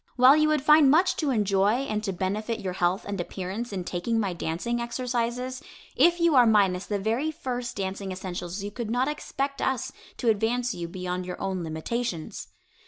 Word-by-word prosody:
While 255 +2 +7
you 305 0 +4
would 305 -3 +1
find 300 -2 +7
much 345 +6 +4
to 300 - 0
enjoy 205 0 +2
and 215 -4 -2
to 195 - -1
benefit 210 +5 -2
your 190 -3 -3
health 180 +1 0
and 200 -2 -2
appearance 195 +7 -5
in 190 -3 -3
taking 185 +7 -1
my 200 -4 -1
dancing 175 +9 -2
exercises, 245 +1 -2 0.3
if 345 +1 +4
you 335 -1 +4
are 250 -3 +6
minus 195 -4 +3
the 205 - -1
very 225 +9 0
first 250 -5 -4
dancing 195 0 -3
essentials 185 0 -5
you 205 - -4
could 230 0 -5
not 245 +3 +1
expect 280 -2 -3
us 265 -3 -1 0.3
to 235 - +1
advance 235 +3 +1
you 170 -1 -5
beyond 180 0 -4
your 180 - -6
own 190 -2 -2
limitations. 165 +3 -4
220 Hz, 185 wpm, -26 LUFS, 190-250 Hz, 0.3 s, While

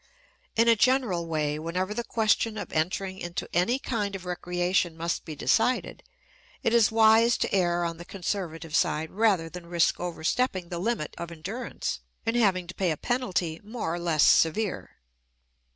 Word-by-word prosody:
In 230 +1 +4
a 230 - +7
general 220 -8 +2
way, 150 -2 -1
whenever 180 +5 -2
the 235 +2 -3
question 220 -1 +1
of - - -6
entering 185 +4 -1
into 175 0 -4
any 180 +9 +2
kind 210 -7 -2
of 185 -1 -7
recreation 180 -1 -1
must 170 +1 -2
be 155 - -6
decided, 230 - +1 0.6
it 230 - +2
is 230 -3 +5
wise 225 +1 +5
to - - -2
err 175 -2 +2
on 165 -1 -3
the 170 - -8
conservative 175 -4 -4
side 160 -1 +1
rather 195 -5 +2
than 170 +1 -9
risk 170 -1 +2
overstepping 180 +3 -1
the 175 - -4
limit 205 -5 -2
of 170 0 -5
endurance 195 - -5 0.3
and 225 - 0
having 195 -6 +2
to 180 - -8
pay 185 -2 0
a 155 - -1
penalty 185 - -1
more 215 -6 -4
or 175 - -3
less 165 -4 +2
severe. 195 +5 +2
180 Hz, 170 wpm, -27 LUFS, 170-220 Hz, 0.6 s, a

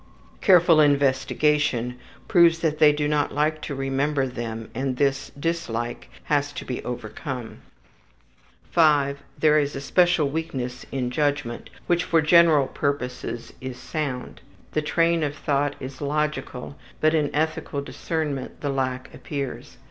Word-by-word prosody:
Careful 175 -4 +6
investigation 140 -2 +2 0.3
proves 170 -2 +5
that 155 -2 0
they 150 -1 +7
do 150 0 -1
not 150 -1 +1
like 155 +1 0
to 145 - -5
remember 135 +1 0
them 115 -3 -6
and 130 +1 -2
this 140 0 0
dislike 120 -8 -3
has 145 -1 0
to - - -6
be 125 - -4
overcome. 125 +1 -6 1.1
5. 145 -4 +3 0.2
There 155 -1 +4
is 145 -1 -1
a - - -3
special 175 +2 +3
weakness 135 -5 -4
in 125 -2 -2
judgment, 145 -3 -1 0.2
which 175 0 +2
for 165 - +2
general 160 -2 +5
purposes 125 -4 -3
is 130 -1 -6
sound. 140 -5 -4 0.3
The 155 - 0
train 165 +2 +2
of 145 -1 -1
thought 145 -1 0
is 130 +1 -8
logical, 145 -2 -2 0.2
but 155 +1 +3
in 150 -3 +2
ethical 155 -1 -1
discernment 150 -3 -4
the 145 - -1
lack 130 -2 -2
appears. 140 -3 -6
145 Hz, 135 wpm, -24 LUFS, 130-155 Hz, 1.1 s, they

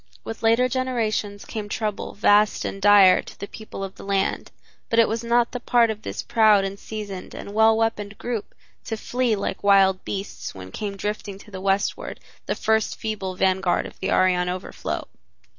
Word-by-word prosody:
With 225 - -7
later 230 +3 +4
generations 230 -5 -2
came 210 -2 -5
trouble 210 -1 -3
vast 205 0 +3
and 195 - -4
dire 200 -2 +7
to - - -13
the 200 - -4
people 215 -2 -8
of 195 -1 -5
the - - -12
land, 195 -1 -1 0.4
but 230 - 0
it 230 - +6
was 225 +2 -2
not 235 0 +2
the 245 - -4
part 240 -2 +3
of 215 -1 -7
this - - -5
proud 215 -3 +4
and 195 +1 -5
seasoned 205 -4 -7
and 200 - -8
well 220 +1 +5
weaponed 215 -2 -1
group 235 -4 -4 0.3
to 225 - -3
flee 245 0 0
like 200 - -4
wild 195 -2 +4
beasts 195 - -5
when 95 -1 -9
came 200 - -5
drifting 205 -1 -4
to 210 - -15
the 190 -1 -7
Westward 195 +1 -1 0.3
the - - 0
first 220 0 +1
feeble 200 -4 -4
vanguard 190 -1 +1
of - - -11
the - - -2
Aryan 180 -1 +3
overflow. 180 0 -4
205 Hz, 185 wpm, -24 LUFS, 195-225 Hz, 0.4 s, dire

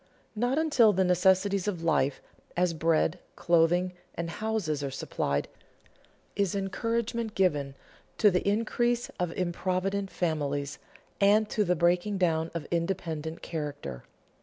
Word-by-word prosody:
Not 245 +5 0
until 275 -9 +4
the 190 0 +2
necessities 190 +2 +3
of 180 -5 -2
life, 145 -4 +1 0.3
as 180 -1 +2
bread, 165 +1 +1 0.2
clothing, 175 +2 +2 0.2
and 170 0 -3
houses, 205 -10 -2
are 140 - -2
supplied, 70 - -2 0.9
is 200 -2 0
encouragement 230 +3 -2
given 145 -8 +1 0.4
to 210 -3 +5
the 180 - +1
increase 240 +3 0
of 180 -2 0
improvident 185 +2 -1
families 145 -5 -2 0.4
and 210 +2 +4
to 215 - +2
the 180 -2 +1
breaking 175 +4 +2
down 165 -3 +1
of 165 - -3
independent 165 -2 -2
character. 145 - -5
180 Hz, 125 wpm, -28 LUFS, 160-205 Hz, 0.9 s, to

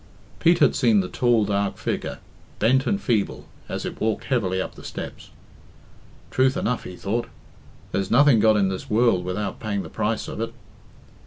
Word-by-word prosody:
Pete 170 +1 +4
had 145 - +4
seen 115 -6 +4
the 90 - -4
tall, 120 0 +2
dark 100 -1 -1
figure, - - -3 0.4
bent 130 +5 +3
and 200 - +1
feeble, 115 - -1 0.2
as - - -4
it - - -6
walked 110 -1 0
heavily 100 -9 0
up - - -3
the - - -13
steps. - - -7 1.0
"Truth 130 0 +2
enough," 125 +1 -1
he 90 - -7
thought, 110 +6 -2 0.6
"there's 95 -1 -1
nothing 140 -1 +5
got 110 0 +5
in 100 -2 +2
this 95 -1 -5
world 110 -4 +3
without 95 +2 -3
paying 100 -3 -2
the 80 - -9
price 110 +5 -2
of - - -5
it." 115 +1 -4
110 Hz, 175 wpm, -24 LUFS, 100-120 Hz, 1.0 s, nothing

